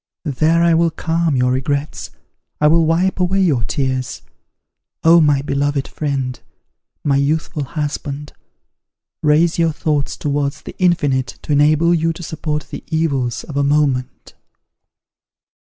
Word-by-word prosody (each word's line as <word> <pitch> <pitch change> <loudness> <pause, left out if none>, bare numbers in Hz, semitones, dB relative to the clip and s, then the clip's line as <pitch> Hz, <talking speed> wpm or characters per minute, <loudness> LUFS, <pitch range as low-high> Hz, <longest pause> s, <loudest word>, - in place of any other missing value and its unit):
There 160 +4 +2
I 170 -1 +4
will 165 +1 +3
calm 165 -1 -1
your 125 0 +2
regrets, 140 +3 -2 0.5
I 150 - +2
will 160 +1 +4
wipe 180 +4 +1
away 185 +2 +1
your 145 -11 +2
tears. 130 -1 -2 0.8
Oh, 165 +1 +7
my 145 -3 +3
beloved 140 0 -1
friend! 135 -4 -3 0.6
my 140 -2 +2
youthful 150 +1 -1
husband! 145 0 -5 0.9
raise 160 +3 +3
your 165 -1 +3
thoughts 150 -2 -1
towards 145 -1 -2
the - - -9
infinite, 145 -8 +1
to - - -5
enable 155 +4 +4
you 165 0 +1
to 175 - -9
support 150 -2 -4
the - - -7
evils 140 -7 -1
of 150 - -9
a 140 - +2
moment.'" 140 -3 0
150 Hz, 135 wpm, -18 LUFS, 140-165 Hz, 0.9 s, Oh